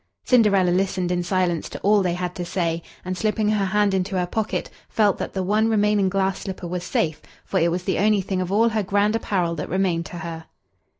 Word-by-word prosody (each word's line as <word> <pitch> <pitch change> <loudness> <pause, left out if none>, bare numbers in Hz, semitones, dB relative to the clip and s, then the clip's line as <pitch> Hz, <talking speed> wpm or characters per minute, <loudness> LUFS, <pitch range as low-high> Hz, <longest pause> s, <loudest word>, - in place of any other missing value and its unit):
Cinderella 200 -7 +4
listened 185 -1 0
in 175 0 +1
silence 175 -2 0
to - - -7
all 205 0 +4
they 180 -2 0
had 180 0 -3
to 180 - -5
say, 170 -1 -1 0.2
and, 185 0 -2
slipping 215 +1 0
her 210 -2 +1
hand 205 +1 +2
into 190 +1 -1
her 180 - +1
pocket, 215 +4 -2 0.2
felt 210 -3 +2
that - - -4
the 190 - -1
one 215 +4 +2
remaining 210 -2 +2
glass 195 0 0
slipper 190 -2 -6
was 175 0 -4
safe, 160 -3 -1 0.2
for - - 0
it 170 - +3
was 175 +1 -2
the - - -1
only 210 0 +3
thing 185 0 -2
of 180 0 -3
all 225 +3 +4
her 220 -1 0
grand 205 +2 +1
apparel 185 -6 0
that 150 -3 -5
remained 180 -2 0
to 175 - -8
her. 165 -1 -6
190 Hz, 225 wpm, -23 LUFS, 175-210 Hz, 0.2 s, Cinderella